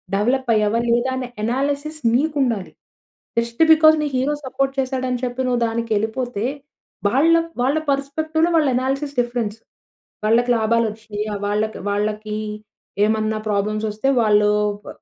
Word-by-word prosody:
Develop 245 Hz, +5 st, 0 dB
అయ్యావా? 215 Hz, +1 st, +2 dB
లేదా? 240 Hz, +2 st, +2 dB
అనే 255 Hz, -1 st, -4 dB, 0.2 s
అనాలిసిస్ 285 Hz, +5 st, -2 dB, 0.2 s
నీకు 300 Hz, +4 st, +1 dB
ఉండాలి. 225 Hz, -7 st, -2 dB, 0.7 s
జస్ట్ 235 Hz, +4 st, -3 dB
‌బికాస్ 315 Hz, 0 st, +6 dB
నీ -, -, 0 dB
హీరో 270 Hz, +4 st, +1 dB
సపోర్ట్ 270 Hz, +1 st, -1 dB
చేసాడు 260 Hz, -1 st, -1 dB
అని 250 Hz, -1 st, -2 dB
చెప్పి 245 Hz, +1 st, -3 dB
నువ్వు 245 Hz, -1 st, 0 dB
దానికెళ్ళిపోతే 225 Hz, 0 st, -2 dB, 0.6 s
వాళ్ళ 290 Hz, +10 st, +4 dB, 0.3 s
వాళ్ళ 270 Hz, +5 st, +2 dB
పర్‌స్పెక్టివ్‌లో 315 Hz, +4 st, 0 dB
వాళ్ళ 310 Hz, -3 st, +4 dB
అనాలిసిస్ 275 Hz, +3 st, -1 dB
డిఫరెన్స్. 240 Hz, -3 st, -1 dB, 0.7 s
వాళ్ళకి 235 Hz, +3 st, +3 dB
లాభాలు 230 Hz, +1 st, +2 dB
వచ్చినా‌యా? 210 Hz, 0 st, -5 dB
వాళ్ళకి, 210 Hz, +2 st, -1 dB
వాళ్ళకి 210 Hz, +1 st, -2 dB, 0.7 s
ఏమన్నా 215 Hz, 0 st, 0 dB
ప్రాబ్లమ్సొస్తే 215 Hz, +3 st, -1 dB
వాళ్ళు 210 Hz, -1 st, +4 dB, 0.3 s
ప -, -, -16 dB
240 Hz, 130 wpm, -21 LUFS, 215-270 Hz, 0.7 s, ‌బికాస్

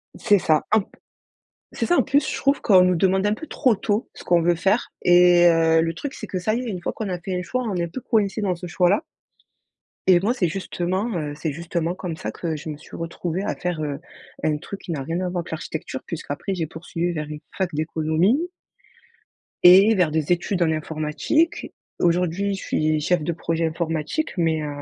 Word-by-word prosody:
C'est 205 Hz, -2 st, +3 dB
ça. 155 Hz, -3 st, +2 dB
En 220 Hz, -1 st, +5 dB
p -, -, -14 dB, 0.9 s
c'est -, -, -1 dB
ça. 350 Hz, -, +3 dB
En -, -, +4 dB
plus, 280 Hz, 0 st, +2 dB
je -, -, -2 dB
trouve 280 Hz, +1 st, +1 dB
qu'on 190 Hz, -5 st, +6 dB
nous 180 Hz, -1 st, +3 dB
demande 190 Hz, +3 st, +2 dB
un 205 Hz, -, +2 dB
peu 315 Hz, +9 st, -7 dB
trop 255 Hz, -5 st, +2 dB
tôt 205 Hz, +3 st, -1 dB
ce -, -, -12 dB
qu'on 175 Hz, -1 st, +3 dB
veut 175 Hz, +1 st, +4 dB
faire 195 Hz, +7 st, 0 dB
et 175 Hz, 0 st, +6 dB
heu, 165 Hz, -1 st, +4 dB
le 165 Hz, 0 st, -1 dB
truc, 280 Hz, +9 st, -5 dB
c'est 215 Hz, -, -7 dB
que 185 Hz, -, -3 dB
ça 215 Hz, +4 st, 0 dB
y 235 Hz, -, 0 dB
est, -, -, -6 dB
une 185 Hz, -4 st, -4 dB
fois -, -, -3 dB
qu'on 215 Hz, -3 st, -4 dB
a 180 Hz, -, -3 dB
fait 185 Hz, +1 st, -4 dB
un 180 Hz, -, -1 dB
choix, 255 Hz, +8 st, -2 dB
on 210 Hz, -5 st, -2 dB
est 170 Hz, -1 st, 0 dB
un -, -, -6 dB
peu 170 Hz, +10 st, -6 dB
coincé 210 Hz, -3 st, 0 dB
dans 190 Hz, -3 st, +1 dB
ce 180 Hz, +1 st, -8 dB
choix-là. 180 Hz, -, +2 dB, 1.1 s
Et 175 Hz, -2 st, +6 dB
moi, 215 Hz, +5 st, +1 dB
c'est 195 Hz, -9 st, +1 dB
justement, 185 Hz, +4 st, -2 dB
heu, 150 Hz, -2 st, -3 dB
c'est 155 Hz, 0 st, -3 dB
justement 170 Hz, +2 st, -2 dB
comme 180 Hz, -3 st, -5 dB
ça -, -, -5 dB
que 165 Hz, -3 st, -4 dB
je 155 Hz, +1 st, -7 dB
me 150 Hz, -, -5 dB
suis 150 Hz, -, -13 dB
retrouvée 170 Hz, +2 st, -4 dB
à 205 Hz, -, -2 dB
faire, 175 Hz, -3 st, -3 dB
heu, 145 Hz, -1 st, -3 dB, 0.4 s
un 155 Hz, -1 st, +1 dB
truc 195 Hz, +6 st, -8 dB
qui 170 Hz, -, -7 dB
n'a 145 Hz, -, -3 dB
rien 165 Hz, +5 st, -2 dB
à 185 Hz, -, -1 dB
voir 180 Hz, 0 st, -2 dB
avec -, -, -11 dB
l'architecture, 160 Hz, -4 st, -5 dB
puisqu'après 170 Hz, +3 st, -4 dB
j'ai 165 Hz, -, -1 dB
poursuivi 170 Hz, +2 st, -4 dB
vers 150 Hz, -3 st, -4 dB
une 150 Hz, 0 st, -7 dB, 0.2 s
fac 190 Hz, -2 st, 0 dB
d'économie 160 Hz, -, +1 dB, 1.2 s
et 195 Hz, +5 st, +8 dB
vers 180 Hz, -5 st, +2 dB
des 155 Hz, 0 st, -1 dB
études 175 Hz, +1 st, 0 dB
en 160 Hz, -, +2 dB
informatique. 155 Hz, -, -1 dB, 0.3 s
Aujourd'hui, 180 Hz, +3 st, +1 dB
je -, -, -8 dB
suis 155 Hz, 0 st, 0 dB
chef 175 Hz, +1 st, +1 dB
de 170 Hz, +2 st, -1 dB
projet 165 Hz, 0 st, -1 dB
informatique 165 Hz, -, -2 dB
mais 160 Hz, -2 st, +1 dB
heu, 150 Hz, -, -3 dB
175 Hz, 225 wpm, -23 LUFS, 160-195 Hz, 1.2 s, et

